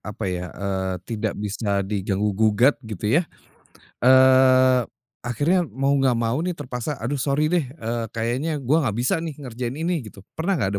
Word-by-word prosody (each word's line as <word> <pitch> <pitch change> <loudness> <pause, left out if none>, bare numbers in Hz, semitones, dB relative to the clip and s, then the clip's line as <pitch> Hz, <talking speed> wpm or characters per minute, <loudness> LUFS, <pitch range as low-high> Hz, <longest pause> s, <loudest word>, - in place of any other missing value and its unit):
apa 105 0 -6
ya, 90 0 -3
eee, 95 -1 -2
tidak 110 -2 -2
bisa 100 -1 -2
diganggu 100 +1 -1
gugat 110 +6 +3
gitu 105 -2 -5
ya. - - -2 0.8
Eee, 130 0 +6 0.4
akhirnya 160 +9 +1
mau 135 +1 -1
nggak 130 -2 +3
mau 115 +3 0
nih, 175 +1 -2
terpaksa, 135 -1 -4
"aduh, 145 +1 -3
sorry 145 +4 +1
deh, 175 -5 +2
e 125 -4 -8 0.3
kayaknya 125 +8 -1
gue 140 +6 +3
nggak 125 -10 -1
bisa 125 +7 +1
nih 160 -3 -5
ngerjain 125 -3 -5
ini" 165 +2 -1
gitu. 100 -2 -13
Pernah 180 +5 -1
nggak 105 - 0
125 Hz, 165 wpm, -23 LUFS, 105-145 Hz, 0.8 s, Eee